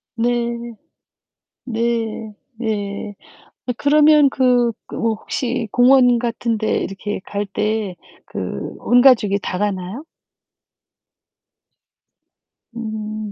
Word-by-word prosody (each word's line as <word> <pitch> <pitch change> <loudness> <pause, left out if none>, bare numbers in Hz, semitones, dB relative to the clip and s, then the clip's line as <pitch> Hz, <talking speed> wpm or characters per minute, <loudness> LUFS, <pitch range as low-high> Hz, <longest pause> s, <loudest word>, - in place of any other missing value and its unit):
네. 235 0 -1 0.9
네. 225 -2 -2 0.2
네. 205 -2 -3 0.5
어 - - +1
그러면 300 0 +5
그, 245 -3 +2 0.2
그 - - -8
뭐 225 -1 0
혹시 240 +1 -3
공원 245 -1 +5
같은 235 -1 -1
데 220 0 0
이렇게 200 +1 -4
갈 205 0 -3
때 210 -1 -2 0.3
그 - - -5
온 245 0 +4
가족이 210 -7 +5
다 180 - -3
가나요? 200 - -3 2.7
음. 215 -2 -5
230 Hz, 145 characters per minute, -20 LUFS, 210-245 Hz, 2.7 s, 그러면